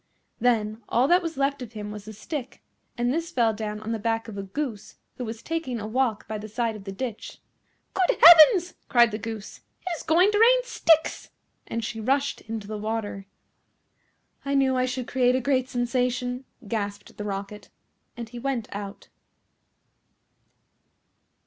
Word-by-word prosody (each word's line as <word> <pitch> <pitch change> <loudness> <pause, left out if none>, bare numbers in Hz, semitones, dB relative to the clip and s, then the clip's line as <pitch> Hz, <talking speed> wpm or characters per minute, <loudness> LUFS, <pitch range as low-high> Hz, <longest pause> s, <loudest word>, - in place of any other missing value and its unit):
Then 220 -2 +1
all 245 +3 +3
that 355 +1 +5
was 330 -4 -5
left 275 0 0
of 235 -2 -8
him 210 -1 -6
was 210 -1 -8
the 215 - -8
stick, 255 +5 -7 0.3
and 240 +1 +1
this 330 +2 -2
fell 235 -9 +2
down 210 -1 -4
on 220 +1 -4
the 225 - -2
back 225 +1 -1
of 220 - -8
a 200 - -4
Goose 215 +1 -5 0.2
who 250 - -4
was 225 0 -7
taking 320 -8 -3
a 210 - -5
walk 225 -1 -1
by 215 -1 -4
the 215 - -7
side 230 0 -1
of 200 -2 -10
the 195 - -5
ditch. 230 +2 -6 0.5
"Good 375 -1 +2
heavens!" 345 +3 +9 0.2
cried 240 -3 +5
the 215 - -4
Goose. 220 -1 -7 0.3
"It 365 - -2
is - - -8
going 355 +6 +4
to 415 - +1
rain - - +6
sticks;" 325 -9 +2 0.4
and 230 -1 -3
she 225 - -5
rushed 275 +5 0
into 220 -2 -6
the 215 0 -5
water. 210 -2 -4 1.2
"I 280 0 -1
knew 265 -1 +3
I 255 0 +1
should 255 -1 -3
create 250 -1 +2
a - - +2
great 260 0 0
sensation," 245 +1 -1 0.2
gasped 205 -2 -4
the 210 - -5
Rocket, 200 +1 -6 0.5
and 235 -1 -6
he 240 +2 -9
went 255 -3 -2
out. 200 0 -7
240 Hz, 175 wpm, -25 LUFS, 215-275 Hz, 1.2 s, heavens